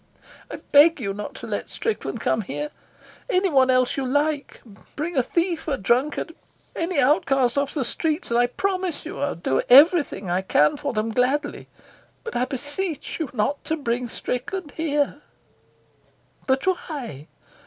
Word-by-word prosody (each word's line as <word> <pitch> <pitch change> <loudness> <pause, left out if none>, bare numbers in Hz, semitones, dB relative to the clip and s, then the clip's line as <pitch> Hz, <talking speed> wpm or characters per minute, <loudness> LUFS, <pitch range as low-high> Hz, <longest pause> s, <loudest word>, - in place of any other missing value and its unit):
"I - - -5 0.2
beg 300 +3 +7
you 200 -5 -2
not 210 +1 -7
to - - -8
let - - -4
Strickland 445 - -3
come 220 - +1
here. 295 +9 -5 0.6
Anyone 345 - +3
else 255 0 +3
you 275 - 0
like. 290 +2 -1 0.4
Bring 320 +4 -3
a 260 - +4
thief, 335 +5 -1
a 280 -3 0
drunkard, 255 +10 0 0.4
any 330 -2 -1
outcast 270 -2 +3
off 280 +1 -1
the 275 -5 0
streets, 315 +2 -2
and 235 - +3
I 245 - +4
promise 370 +4 -2
you 355 +5 -6
I'll 285 0 -1
do 165 -5 0
everything 280 - +6
I 180 +2 0
can 150 -5 +3
for 285 -1 -3
them 220 -1 -1
gladly. 255 +6 0 0.6
But 465 - -7
I 250 - +2
beseech 290 +7 -4
you 315 -5 -2
not 255 +5 -1
to 320 - -1
bring 245 -3 -2
Strickland 290 +9 -4
here." 295 -2 -1 1.3
"But 265 0 +1
why?" 280 - -3
280 Hz, 155 wpm, -24 LUFS, 245-320 Hz, 1.3 s, beg